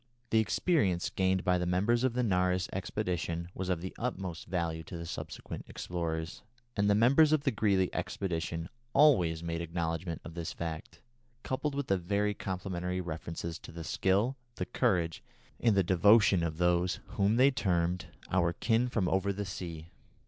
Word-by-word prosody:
The 110 Hz, -, +5 dB
experience 95 Hz, -, +1 dB
gained 95 Hz, -1 st, +1 dB
by 90 Hz, -1 st, +2 dB
the 90 Hz, -, -1 dB
members 105 Hz, +7 st, +2 dB
of 130 Hz, -2 st, +2 dB
the 125 Hz, +1 st, 0 dB
Nares 90 Hz, -3 st, +1 dB
expedition 85 Hz, -3 st, -2 dB
was 95 Hz, 0 st, -4 dB
of 90 Hz, -3 st, 0 dB
the 95 Hz, -, -6 dB
utmost 95 Hz, -8 st, -4 dB
value 85 Hz, -3 st, -1 dB
to 85 Hz, -1 st, -6 dB
subsequent 85 Hz, -, -6 dB
explorers, 85 Hz, -1 st, -4 dB, 0.3 s
and 100 Hz, 0 st, +2 dB
the 100 Hz, -, +5 dB
members 135 Hz, +8 st, +5 dB
of 155 Hz, -2 st, +3 dB
the 135 Hz, -, +2 dB
Greely 100 Hz, -4 st, +1 dB
expedition 85 Hz, -3 st, -3 dB, 0.3 s
always 90 Hz, -, +4 dB
made 85 Hz, 0 st, -2 dB
acknowledgment 85 Hz, 0 st, -3 dB
of 85 Hz, -, -8 dB
this 85 Hz, -1 st, -4 dB
fact, 80 Hz, -2 st, -6 dB, 0.4 s
coupled 140 Hz, +2 st, -2 dB
with 140 Hz, -1 st, -2 dB
very 100 Hz, +2 st, +1 dB
complimentary 90 Hz, -2 st, -3 dB
references 85 Hz, -1 st, -5 dB
to -, -, -11 dB
the 85 Hz, 0 st, -7 dB
skill, 100 Hz, -, +1 dB, 0.2 s
the -, -, -3 dB
courage, 90 Hz, -9 st, 0 dB, 0.4 s
and 110 Hz, -4 st, +3 dB
the 95 Hz, -, +5 dB
devotion 95 Hz, +2 st, +5 dB
of 80 Hz, -2 st, -2 dB
those 90 Hz, +1 st, +2 dB
whom 100 Hz, +2 st, +2 dB
they 130 Hz, +3 st, +6 dB
termed 90 Hz, -7 st, 0 dB, 0.2 s
"our 85 Hz, -2 st, +2 dB
kin 115 Hz, +5 st, +1 dB
from 105 Hz, -6 st, 0 dB
over 95 Hz, +2 st, +1 dB
the 100 Hz, +1 st, -3 dB
sea." 85 Hz, -3 st, -7 dB
90 Hz, 165 wpm, -31 LUFS, 85-105 Hz, 0.4 s, they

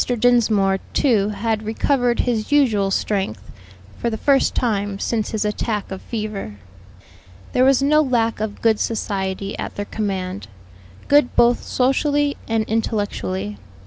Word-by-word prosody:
Dinsmore, 215 Hz, -5 st, +3 dB, 0.2 s
too, 215 Hz, -7 st, +3 dB
had 220 Hz, +1 st, -1 dB
recovered 240 Hz, +3 st, +1 dB
his 230 Hz, 0 st, -2 dB
usual 225 Hz, -9 st, +3 dB
strength, 190 Hz, -, -2 dB, 0.5 s
for 235 Hz, -, 0 dB
the 220 Hz, -, -3 dB
first 275 Hz, +3 st, +2 dB
time 205 Hz, -4 st, -1 dB
since 220 Hz, +1 st, -1 dB
his 215 Hz, -1 st, -2 dB
attack 210 Hz, 0 st, -2 dB
of 190 Hz, -, -6 dB
fever. 210 Hz, -, -5 dB, 1.0 s
There 250 Hz, -, +3 dB
was 270 Hz, 0 st, +4 dB
no 305 Hz, +2 st, +4 dB
lack 235 Hz, -6 st, 0 dB
of 210 Hz, -1 st, -4 dB
good 225 Hz, -2 st, +3 dB
society 195 Hz, -3 st, -2 dB
at -, -, -5 dB
their 205 Hz, -, -3 dB
command; 190 Hz, -, -4 dB, 0.6 s
good 290 Hz, -3 st, +4 dB
both 240 Hz, 0 st, +4 dB
socially 285 Hz, +3 st, +1 dB
and 225 Hz, -1 st, +1 dB
intellectually. 105 Hz, -, -2 dB
220 Hz, 135 wpm, -21 LUFS, 200-245 Hz, 1.0 s, was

